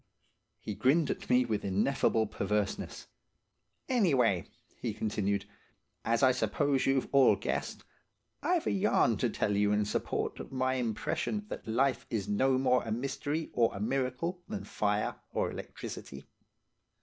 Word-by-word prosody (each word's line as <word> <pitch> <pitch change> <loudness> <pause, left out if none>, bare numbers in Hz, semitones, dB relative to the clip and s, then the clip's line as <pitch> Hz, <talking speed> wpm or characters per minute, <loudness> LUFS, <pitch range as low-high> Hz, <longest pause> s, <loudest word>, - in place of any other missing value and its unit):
He 105 - -5
grinned 140 +8 +3
at - - -6
me 125 0 +4
with 110 -3 -2
ineffable 110 +3 +2
perverseness. 105 -1 -2 0.8
"Anyway," 135 - +3 0.3
he 110 -4 -3
continued, 100 -2 -1 0.6
"as 115 +3 +1
I 130 - +7
suppose 130 +3 +1
you've 135 -1 +2
all 140 -2 +6
guessed, - - -3 0.6
I've 355 -2 +1
a - - +1
yarn 190 - +3
to 120 - +1
tell 105 -1 0
you 105 0 +3
in 105 0 +2
support - - -2
of - - -8
my 130 0 0
impression 125 - -2
that - - -7
life 130 +4 +1
is 105 -4 -2
no 130 +6 +2
more 125 -1 +3
a 115 - -5
mystery 145 +6 -2
or 115 -1 +2
a - - -5
miracle 135 - -1
than 210 -2 -4
fire 105 0 -1 0.2
or - - 0
electricity. 70 0 -8
125 Hz, 145 wpm, -31 LUFS, 105-135 Hz, 0.8 s, I